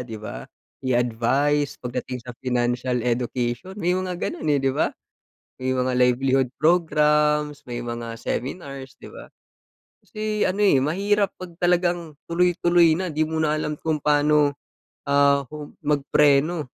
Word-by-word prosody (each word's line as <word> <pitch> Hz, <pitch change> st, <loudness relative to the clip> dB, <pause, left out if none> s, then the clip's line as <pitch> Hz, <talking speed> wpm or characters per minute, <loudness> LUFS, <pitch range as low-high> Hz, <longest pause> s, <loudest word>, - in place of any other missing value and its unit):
'di 115 Hz, -3 st, -7 dB
ba, 110 Hz, -, -8 dB, 0.3 s
i-advice 130 Hz, +4 st, +1 dB
pagdating 125 Hz, 0 st, -5 dB
sa 125 Hz, -, -7 dB
financial 125 Hz, 0 st, -1 dB
education, 125 Hz, -, -2 dB
may 180 Hz, -2 st, 0 dB
mga 185 Hz, -1 st, -2 dB
ganun 155 Hz, -, -4 dB
eh, 145 Hz, -, +4 dB
'di 135 Hz, -1 st, +1 dB
ba? 145 Hz, -, +1 dB, 0.7 s
May 130 Hz, 0 st, -1 dB
mga 130 Hz, 0 st, 0 dB
livelihood 130 Hz, +1 st, +2 dB
programs, 150 Hz, -3 st, +2 dB
may 120 Hz, -1 st, -5 dB
mga 120 Hz, -1 st, -5 dB
seminars, 135 Hz, +2 st, -5 dB
'di -, -, -10 dB
ba? -, -, -11 dB, 0.8 s
Kasi 215 Hz, 0 st, -4 dB
ano 190 Hz, -, -3 dB
eh 135 Hz, -9 st, +4 dB
mahirap 200 Hz, +7 st, +1 dB
pag 185 Hz, -2 st, -9 dB
talagang 175 Hz, -3 st, +1 dB
tuloy-tuloy 175 Hz, -1 st, +3 dB
na, 185 Hz, -4 st, -3 dB
'di 155 Hz, +1 st, 0 dB
mo 160 Hz, -, -2 dB
na 155 Hz, -1 st, +1 dB
alam 150 Hz, -1 st, -2 dB
kung 155 Hz, -2 st, -2 dB
paano, 150 Hz, -1 st, +3 dB, 0.5 s
ah, 140 Hz, 0 st, +4 dB, 0.4 s
mag-preno. 150 Hz, +2 st, +2 dB
145 Hz, 135 wpm, -23 LUFS, 125-170 Hz, 0.8 s, eh